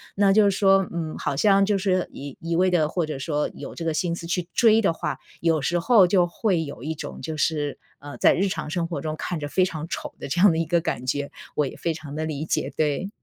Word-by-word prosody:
那 200 -1 +4
就 205 -1 +5
是 195 - -1
说， 195 -2 +4
嗯， 165 -2 -3
好 145 - -2
像 195 +5 +4
就 205 0 +1
是 185 -2 0
一 140 -1 -9
一 165 0 -2
味 185 +2 +3
地 170 -4 +2
或 170 +2 -1
者 155 -2 -5
说 150 +1 -1
有 - - -8
这 170 - -6
个 165 - 0
心 170 +1 -1
思 170 -1 -8
去 175 0 -2
追 225 -1 +5
的 195 -6 +2
话， 150 -5 -3 0.2
有 165 -2 +2
时 175 +6 0
候 210 +1 +6
就 180 -1 +3
会 175 -1 0
有 140 -5 -8
一 155 +2 -2
种 - - -7
就 160 -1 -5
是， 150 -2 0 0.2
呃， 145 0 -9
在 - - +5
日 195 - +1
常 180 - -4
生 170 0 -1
活 170 - -4
中 155 -1 -3
看 175 0 -3
着 145 - -4
非 185 +5 +2
常 160 -3 -5
丑 - - -5
的 - - -6
这 155 +6 -2
样 200 -1 +7
的 160 - -1
一 165 - 0
个 170 +1 +2
感 125 -5 -3
觉， 140 +2 -2 0.2
我 150 - +2
也 - - -8
非 165 - -1
常 155 -2 -9
地 155 +1 -2
理 155 -1 -4
解， - - -1
对。 155 +5 0
165 Hz, 285 characters per minute, -24 LUFS, 150-185 Hz, 0.2 s, 样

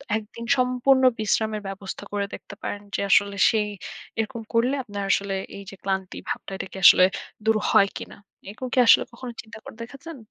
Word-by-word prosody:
১ 220 - -2
দিন 235 - -7
সম্পূর্ণ 255 +1 +3 0.2
বিশ্রামের 215 0 0
ব্যবস্থা 195 0 -7
করে 200 -1 0
দেখতে - - -9
পারেন। 205 - -4
যে - - -1
আসলে 200 +1 +4
সেই 215 -2 +1 0.5
এরকম 225 +1 -2
করলে 235 +3 +2
আপনার 205 -3 -5
আসলে 200 -1 0 0.2
এই 200 - -8
যে - - -10
ক্লান্তি 190 -1 -2
ভাবটাম - - -4
এটা 190 - -5
কি - - -9
আসলে 185 - +9 0.4
দূর 220 0 +4 0.2
হয় 200 - +5
কিনা? - - -9 0.3
এরকম 235 +5 -6
কি 260 - +3
আসলে - - +7
কখনো 240 +1 -8
চিন্তা 225 0 -12
করে - - -11
দেখাচ্ছেন? 280 +6 -9
220 Hz, 185 wpm, -24 LUFS, 200-245 Hz, 0.5 s, আসলে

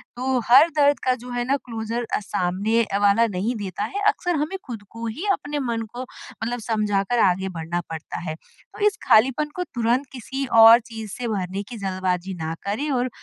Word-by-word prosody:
तो 255 +1 0
हर 275 +7 +8
दर्द 290 -1 +4
का 255 - +4
जो 250 +1 -11
है 245 0 -1
ना 275 +2 +1
क्लोजर 230 0 -3
अ, - - 0
सामने 200 +3 0
अ, 200 -2 -2
वाला 205 +3 +4
नहीं 210 +4 -2
देता 200 -2 -4
है 400 - -3
अक्सर 355 -4 +1
हमें 305 +6 -2
खुद 230 -6 -7
को 230 +1 -7
ही 245 - -5
अपने 295 -6 -2
मन 235 -4 -2
को 245 - -5
मतलब 245 -1 -6
समझाकर 210 +1 +1
आगे 190 -1 +2
बढ़ना 165 +2 -2
पड़ता 160 -1 -6
है। 155 - -3
तो 165 - -20
इस 405 - 0
खालीपन 260 +6 +4
को 360 - -1
तुरंत 245 -3 0
किसी 270 +2 -4 0.2
और 225 +1 +10
चीज़ 225 -4 -8
से 245 - -4
भरने 195 -2 -3
की 235 +3 -9
जल्दबाज़ी 185 -1 -2
ना 160 +1 -2
करें 220 +10 -2
और 255 -1 0
230 Hz, 200 wpm, -23 LUFS, 200-255 Hz, 0.2 s, और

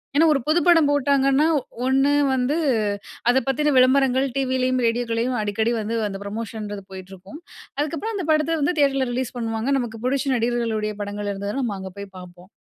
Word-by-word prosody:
ஏன்னா, 325 +3 +5
ஒரு 275 - 0
புது 320 +3 +3
படம் 330 -4 +5
போட்டாங்கன்னா 280 +1 +3 0.4
ஒண்ணு 270 +2 +3 0.2
வந்து 260 +4 0 0.7
அத 260 - +2
பத்தின 295 +2 +1
விளம்பரங்கள் 265 +1 +3
டிவிலேயும், 255 -1 0
ரேடியோக்களையும் 235 +1 -1
அடிக்கடி 220 +3 0
வந்து 225 +2 -2
அந்த 195 - -6
ப்ரமோஷன்றது 210 -1 -6
போயிட்டுருக்கும். 190 - -11 0.4
அதுக்கப்புறம், 330 +9 -2
அந்த 370 - -3
படத்த 310 +1 +1
வந்து 315 +4 0
தியேட்டர்ல 270 -3 +2
ரிலீஸ் 255 0 -3
பண்ணுவாங்க. 225 +1 -2
நமக்கு 225 -2 -5
புடிச்ச 270 +1 0
நடிகர்களுடைய 230 -3 -1
படங்கள் 205 0 -4
இருந்ததுன்னா, 200 +6 -3
நம்ம 210 -4 -2
அங்க 190 0 -7
போய் 200 -1 -7
பார்ப்போம். 180 +1 -14
250 Hz, 155 wpm, -22 LUFS, 215-280 Hz, 0.7 s, ஏன்னா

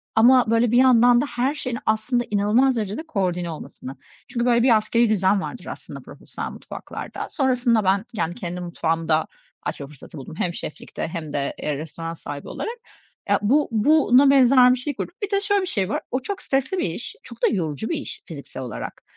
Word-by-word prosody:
ama, 240 +1 +6
böyle, 230 0 +3
bir 240 - +4
yandan 245 -1 +6
da - - 0
her 265 0 -1
şeyin 255 -6 -3
aslında 220 +3 +1
inanılmaz 215 +6 +3
derecede 215 +6 -3
koordine 180 - -1
olmasını. 135 -3 -8 0.3
Çünkü, 240 -1 -1
böyle, 235 -1 +4
bir 240 -3 +6
askerî 230 +2 +2
düzen 195 -1 +2
vardır - - -7
aslında - - -8
profesyonel - - -7
mutfaklarda. - - -7
Sonrasında 250 -5 +2
ben, 195 +2 +2
yani, 175 -5 -2
kendi 180 -1 -5
mutfağımı 165 -2 -2
da 155 0 +2 0.4
açma 145 -1 -4
fırsatı 150 +2 -13
buldum. 135 - -9
Hem 175 - -1
şeflikte 155 - -6
hem 160 -3 -6
de, 140 -1 -2
eee, 150 -2 -2
restoran 165 +2 -6
sahibi 145 -3 -7
olarak. 465 +2 -5 0.5
Ya, - - +4
bu 280 +8 +3
buna 270 +3 +5
benzer 255 -2 +6
bir - - -1
şey 285 +2 -3
kurduk. 345 - -5
Bir 405 - -2
de 400 0 +2
şöyle 405 -1 +2
bir - - -3
şey 195 - -1
var, - - -1
o 255 - 0
çok 380 +8 -5
stresli 270 +7 0
bir - - +1
iş, 170 +9 -6
çok 235 -1 -12
da - - +6
yorucu 165 -1 -2
bir 335 - 0
iş 290 - -7
fiziksel 140 -5 -8
olarak. 125 - -7
225 Hz, 195 wpm, -23 LUFS, 170-255 Hz, 0.5 s, ama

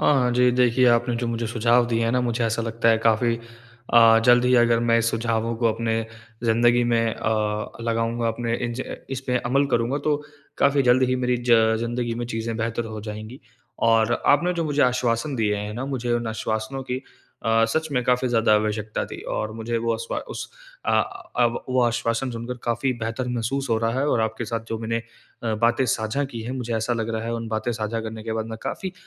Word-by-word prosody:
हाँ 130 -4 +3
जी, 125 0 +4
देखिए 125 0 +3
आपने 120 +1 +2
जो 120 +1 -2
मुझे 115 0 -2
सुझाव 120 +1 +3
दिए 115 -1 0
हैं 115 - +1
ना 125 - +2
मुझे 120 -1 0
ऐसा 115 0 0
लगता 115 0 0
है 115 -1 +5
काफ़ी 115 +1 +2 0.6
अ, 115 -1 +8
जल्द 120 0 +6
ही 125 - +4
अगर 120 -1 +4
मैं 115 0 +3
सुझावों 115 0 0
को 115 - +1
अपने 115 0 -1 0.4
ज़िंदगी 120 +1 +3
में 115 -1 +1
अ, 105 -1 -1
लगाऊँगा 115 0 -1
अपने 115 +1 -2
इन 120 - -4
ज 130 - -5
इस 135 0 -4
में 125 0 +2
अमल 135 +4 +1
करूँगा 120 +4 +1
तो 150 -1 +2 0.4
काफ़ी 140 0 +3
जल्द 125 +1 +4
ही 130 - +1
मेरी 125 -1 +1
ज 110 -1 +5
ज़िंदगी 120 0 -2
में 120 +1 -4
चीज़ें 115 -1 -3
बेहतर 115 +1 -2
हो 110 -1 -6
जाएँगी। 110 +4 -8 0.4
और 115 0 +4 0.2
आपने 170 +5 +4
जो 170 -1 -1
मुझे 145 -1 +1
आश्वासन 125 +2 +1
दिए 105 -2 +1
हैं 105 +1 -4
ना 125 +3 -4
मुझे 125 -3 -2
उन 120 -1 0
आश्वासनों 110 +4 -3
की 125 - 0 0.5
अ, 115 +1 +3
सच 160 +6 -1
में 125 - +1
काफ़ी 125 +1 +2
ज़्यादा 115 -2 +3
आवश्यकता 105 0 -1
थी। - - -8 0.2
और 110 0 -2
मुझे 115 +1 -3
वो 115 0 0
अश्वा 115 +1 -4
उस - - -5 0.4
अ, - - 0 0.5
अब 120 -1 +1
वो 130 0 +2
आश्वासन 120 +1 0
सुनकर 120 +1 -5
काफ़ी 120 +3 0
बेहतर 115 +3 -3
महसूस 125 +3 -2
हो 115 - +3
रहा 115 +3 0
है 145 - +1
और 115 - +2
आपके 110 +1 -2
साथ 115 +1 -3
जो 115 - -3
मैंने 115 +1 -2 0.4
अ, 115 -2 0
बातें 120 +4 +2
साझा 115 +5 0
की 120 -4 -7
हैं, 120 - -5
मुझे 120 -2 -3
ऐसा 110 +2 -1
लग 115 -1 -2
रहा 110 - -2
है 115 - -3
उन 115 -1 -4
बातें 110 +2 -1
साझा 110 +1 -3
करने 110 0 -6
के 110 0 -4
बाद 110 0 -2
मैं 110 - -6
काफ़ी 190 -1 -4
115 Hz, 215 wpm, -24 LUFS, 115-125 Hz, 0.6 s, अ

